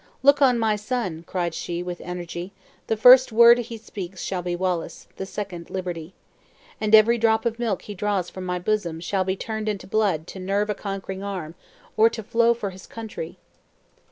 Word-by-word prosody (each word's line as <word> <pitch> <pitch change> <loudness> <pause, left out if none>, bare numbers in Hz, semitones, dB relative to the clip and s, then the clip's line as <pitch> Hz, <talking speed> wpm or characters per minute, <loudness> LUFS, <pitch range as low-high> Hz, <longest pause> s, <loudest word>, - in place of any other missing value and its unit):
"Look 280 +1 +5
on 255 -3 +5
my 220 -2 +1
son!" 210 -7 -3
cried 175 -3 -2
she, 175 +1 -4
with 180 -1 -6
energy; 180 +1 -6 0.3
"the 225 - 0
first 250 +3 +8
word 235 +2 +7
he 235 -1 -5
speaks 195 -4 -8
shall 185 -2 -2
be 175 0 -2
Wallace; 180 -2 -3
the 190 - -5
second 185 -5 -6
liberty. 180 -2 -5 0.7
And 215 0 +5
every 230 +2 +5
drop 220 0 +2
of 230 0 -1
milk 225 -6 -1
he 205 - -7
draws 200 -2 -1
from 185 - -8
my 180 0 -2
bosom, 175 -3 -1
shall 185 +3 -1
be 190 0 -1
turned 220 +1 -4
into 200 -3 -4
blood 195 -6 0
to 190 - -9
nerve 200 +3 0
a - - 0
conquering 195 -1 -5
arm, 185 -6 -5 0.4
or 220 +1 +6
to 225 -1 -6
flow 235 +2 +3
for 205 -4 -4
his 185 0 -13
country!" 215 -7 -7
200 Hz, 190 wpm, -24 LUFS, 180-220 Hz, 0.7 s, first